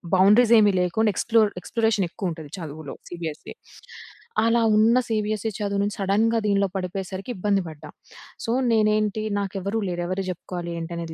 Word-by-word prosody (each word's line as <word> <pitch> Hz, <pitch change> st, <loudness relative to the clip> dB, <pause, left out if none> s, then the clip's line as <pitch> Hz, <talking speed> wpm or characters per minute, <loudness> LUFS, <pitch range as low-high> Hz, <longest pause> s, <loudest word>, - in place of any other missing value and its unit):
బౌండరీసెమీ 210 Hz, +2 st, +6 dB
లేకుండా 210 Hz, +5 st, +1 dB
ఎక్స్‌ప్లోర్ 220 Hz, -1 st, +3 dB
ఎక్స్‌ప్లోరేషనేక్కువుంటది 185 Hz, -8 st, -2 dB
చదువులో, 155 Hz, -3 st, -7 dB
సీబీఎస్ఈ. 165 Hz, -3 st, -6 dB, 0.9 s
అలా 230 Hz, +1 st, +3 dB, 0.2 s
ఉన్న 225 Hz, +3 st, +5 dB
సీబీఎస్ఈ 215 Hz, 0 st, -1 dB
చదువు 200 Hz, -1 st, -1 dB
నుంచి, 205 Hz, 0 st, -2 dB
సడెన్‌గా 215 Hz, +4 st, +2 dB
దీనిలో 200 Hz, -1 st, +2 dB
పడిపోయేసరికి 190 Hz, +3 st, -5 dB
ఇబ్బంది 200 Hz, +1 st, +1 dB
పడ్డా. 155 Hz, -2 st, -11 dB, 0.6 s
సో, 230 Hz, -, -1 dB, 0.2 s
నేనేంటి 215 Hz, -1 st, +2 dB, 0.2 s
నాకు 200 Hz, -1 st, -3 dB
ఎవరూ 200 Hz, +4 st, -1 dB
లేరు. 175 Hz, 0 st, -3 dB
ఎవరికీ 185 Hz, +1 st, -3 dB
జెప్పుకోవాలి 175 Hz, -1 st, -6 dB
ఏంటనేది 165 Hz, 0 st, -5 dB
200 Hz, 130 wpm, -24 LUFS, 175-215 Hz, 0.9 s, బౌండరీసెమీ